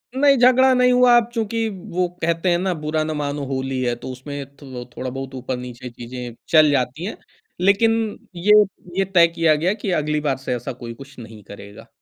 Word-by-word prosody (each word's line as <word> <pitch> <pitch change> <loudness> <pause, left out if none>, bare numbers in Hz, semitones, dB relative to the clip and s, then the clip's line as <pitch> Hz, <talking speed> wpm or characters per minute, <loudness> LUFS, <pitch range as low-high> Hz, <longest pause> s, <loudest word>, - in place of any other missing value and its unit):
नहीं 275 0 +4
झगड़ा 255 +1 +5
नहीं 250 0 +4
हुआ, 250 -1 +6
अब 235 -1 +1
चूँकि 225 0 -1
वो 185 -2 -3
कहते 170 +2 0
हैं 175 - +3
ना 185 -1 0
बुरा 155 0 -2
ना 155 - -3
मानो 145 -1 -3
होली 130 -1 -3
है, 120 -1 0
तो 120 - -9
उसमें 140 +2 -7
थो 130 -4 -8
थोड़ा-बहुत 135 +1 -5
ऊपर-नीचे 125 -1 -6
चीज़ें 120 0 -8
चल 155 -2 +6
जाती 135 +4 -1
हैं। 215 - -5 0.4
लेकिन 200 +4 +4 0.4
ये 210 +4 +6 0.4
ये, 195 - +2
तय 175 -3 +5
किया 165 -2 +2
गया 175 +6 +1
कि 205 -3 -4
अगली 150 0 -1
बार 140 -3 0
से 130 -2 -3
ऐसा 120 +2 -5
कोई 115 0 -6
कुछ 135 +2 -14
नहीं 110 -3 -11
करेगा। 100 0 -12
150 Hz, 195 wpm, -21 LUFS, 130-195 Hz, 0.4 s, हुआ